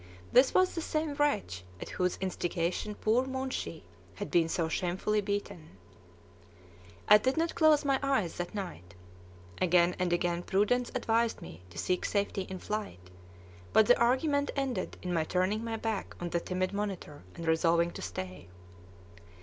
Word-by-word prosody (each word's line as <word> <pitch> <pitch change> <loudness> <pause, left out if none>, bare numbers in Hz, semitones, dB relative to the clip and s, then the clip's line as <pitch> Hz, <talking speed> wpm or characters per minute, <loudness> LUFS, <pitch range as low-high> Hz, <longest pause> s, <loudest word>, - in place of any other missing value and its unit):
This 255 +2 +6
was 370 0 +4
the 330 - -3
same 310 -1 -1
wretch 280 - 0 0.2
at - - -7
whose 180 -1 0
instigation 185 +2 -2
poor 235 +6 +1
Moonshee 265 0 -4 0.3
had - - -6
been 165 -2 +3
so 165 0 0
shamefully 185 +6 0
beaten. 195 - -4 1.3
I 210 0 +9
did 260 +7 0
not 330 +1 +1
close 310 -2 +4
my 275 -1 +2
eyes 270 -11 0
that 175 +4 -4
night. 100 - -6 0.7
Again 175 0 +4
and 180 -1 0
again 175 0 +1
prudence 210 +7 +1
advised 230 -2 +1
me 80 - -10
to 85 - -13
seek 180 - 0
safety 200 -2 -1
in 190 - -5
flight, 185 - -5 0.6
but 220 - +6
the 245 - +5
argument 285 +4 +2
ended 265 -9 -2
in 180 -1 -2
my 165 -2 +2
turning 185 +6 0
my 225 -1 -3
back 220 -3 -3
on 175 -1 -4
the 170 - +1
timid 185 +2 -2
monitor, 200 -7 -4
and 170 - -6
resolving 170 +1 +3
to - - -8
stay. 90 0 -6
195 Hz, 160 wpm, -30 LUFS, 170-245 Hz, 1.3 s, I